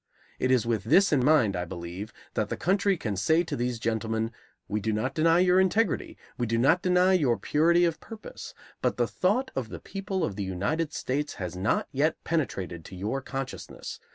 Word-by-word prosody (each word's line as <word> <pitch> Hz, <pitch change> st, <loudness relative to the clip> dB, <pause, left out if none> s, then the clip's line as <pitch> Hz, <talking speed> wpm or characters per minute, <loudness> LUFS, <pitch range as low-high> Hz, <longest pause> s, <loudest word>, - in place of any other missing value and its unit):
It 130 Hz, -, +1 dB
is 125 Hz, -3 st, +3 dB
with 110 Hz, -3 st, -1 dB
this 195 Hz, -, +5 dB
in 130 Hz, -4 st, +3 dB
mind, 130 Hz, -9 st, +4 dB
I 90 Hz, -, -1 dB
believe, 90 Hz, +3 st, -7 dB, 0.2 s
that -, -, -1 dB
the -, -, -3 dB
country 195 Hz, +2 st, +2 dB
can 110 Hz, -9 st, -3 dB
say 160 Hz, -, +3 dB
to 165 Hz, -, -4 dB
these 120 Hz, 0 st, -1 dB
gentlemen: 115 Hz, 0 st, -1 dB, 0.4 s
"We 105 Hz, -, -1 dB
do 110 Hz, +2 st, -1 dB
not 110 Hz, +6 st, -1 dB
deny 165 Hz, +2 st, +4 dB
your 185 Hz, 0 st, +5 dB
integrity; 190 Hz, +1 st, +1 dB, 0.2 s
we 120 Hz, -, 0 dB
do 115 Hz, +1 st, 0 dB
not 155 Hz, +9 st, +4 dB
deny 180 Hz, +1 st, +4 dB
your 140 Hz, -10 st, +3 dB
purity 170 Hz, +3 st, +3 dB
of 165 Hz, -2 st, -1 dB
purpose; 225 Hz, -1 st, -10 dB, 0.3 s
but -, -, 0 dB
the -, -, +3 dB
thought 240 Hz, +9 st, 0 dB
of 125 Hz, -5 st, -3 dB
the -, -, -7 dB
people 195 Hz, -2 st, -4 dB
of 100 Hz, -10 st, -2 dB
the 100 Hz, -, -2 dB
United 105 Hz, -, -1 dB
States 145 Hz, 0 st, -2 dB
has 90 Hz, -2 st, -5 dB
not 95 Hz, +4 st, 0 dB
yet 150 Hz, +4 st, +1 dB
penetrated 95 Hz, -, -2 dB
to -, -, -9 dB
your 105 Hz, +9 st, -2 dB
consciousness. 135 Hz, 0 st, -6 dB
135 Hz, 200 wpm, -27 LUFS, 110-170 Hz, 0.4 s, this